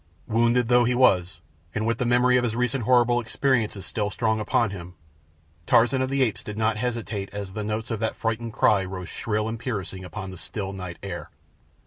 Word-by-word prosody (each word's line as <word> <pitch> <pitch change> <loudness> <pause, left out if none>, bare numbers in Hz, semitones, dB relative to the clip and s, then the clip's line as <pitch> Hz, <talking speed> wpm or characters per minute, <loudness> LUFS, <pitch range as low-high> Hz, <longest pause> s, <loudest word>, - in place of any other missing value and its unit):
Wounded 120 +1 +2
though 120 0 +5
he 120 +1 +1
was, 95 -8 +3 0.3
and 110 0 0
with 115 0 0
the 125 - 0
memory 125 +1 +4
of 125 - +3
his 115 -2 -1
recent 125 0 0
horrible 120 -1 +4
experience 120 -2 0
still 105 0 -1
strong 110 +2 0
upon 110 +1 +1
him, 90 -2 -8 0.7
Tarzan 120 +3 +4
of 130 - 0
the 135 0 +2
Apes 105 -6 -1
did 105 0 -7
not 110 0 +1
hesitate 115 -4 -3
as 100 -2 -6
the 105 - -3
notes 110 +2 -3
of 115 - -2
that 110 0 -1
frightened 115 0 -2
cry 100 -2 +3
rose 90 -1 -6
shrill 105 -1 -2
and 115 0 -4
piercing 100 -6 -4
upon 95 +1 -6
the 95 - -9
still 95 +3 -4
night 90 -3 -6
air. 95 -3 -6
110 Hz, 200 wpm, -25 LUFS, 100-120 Hz, 0.7 s, though